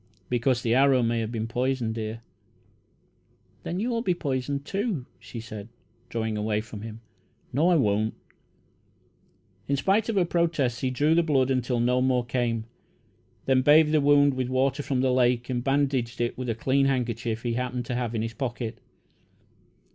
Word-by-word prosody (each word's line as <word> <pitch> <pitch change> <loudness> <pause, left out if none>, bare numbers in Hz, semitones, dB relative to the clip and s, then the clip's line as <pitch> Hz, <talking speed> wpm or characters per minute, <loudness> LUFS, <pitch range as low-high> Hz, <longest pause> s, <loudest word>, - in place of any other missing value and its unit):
"Because 120 0 +1
the 115 - +2
arrow 135 -1 +4
may 115 0 +1
have 110 0 -3
been 115 -1 -3
poisoned, 125 -1 -1
dear." 110 0 -5 1.4
"Then 175 +2 -4
you'll 230 +1 -1
be 185 -7 +1
poisoned, 140 -2 -2
too," 195 - -2
she 120 - -8
said, 110 -1 -8 0.4
drawing 110 -1 -2
away 105 0 0
from 110 -1 -8
him. 110 0 -8 0.5
"No, 155 +7 +3
I 180 - +4
won't." 110 -5 +1 1.5
In 140 - +1
spite 200 +9 +1
of 225 - 0
her 185 -3 +3
protests, 165 -8 0
he 130 - 0
drew 145 +5 +2
the 170 - +4
blood 135 -5 +2
until 125 -1 0
no 125 +2 +2
more 125 -1 +2
came, 120 -2 -1 0.8
then 130 -1 +3
bathed 150 +3 +6
the 155 -1 +3
wound 145 0 +5
with 130 -1 -2
water 130 +2 +1
from 135 -2 -1
the 130 -1 +2
lake, 125 0 +2
and 120 -1 -1
bandaged 135 -3 0
it 120 0 -1
with 125 -1 -4
a 115 - 0
clean 135 +4 +2
handkerchief 115 -3 -1
he 120 -1 -1
happened 125 0 -2
to 125 - -4
have 120 -1 -2
in 110 - -1
his 115 0 -4
pocket. 120 -2 -4
125 Hz, 175 wpm, -26 LUFS, 115-140 Hz, 1.5 s, bathed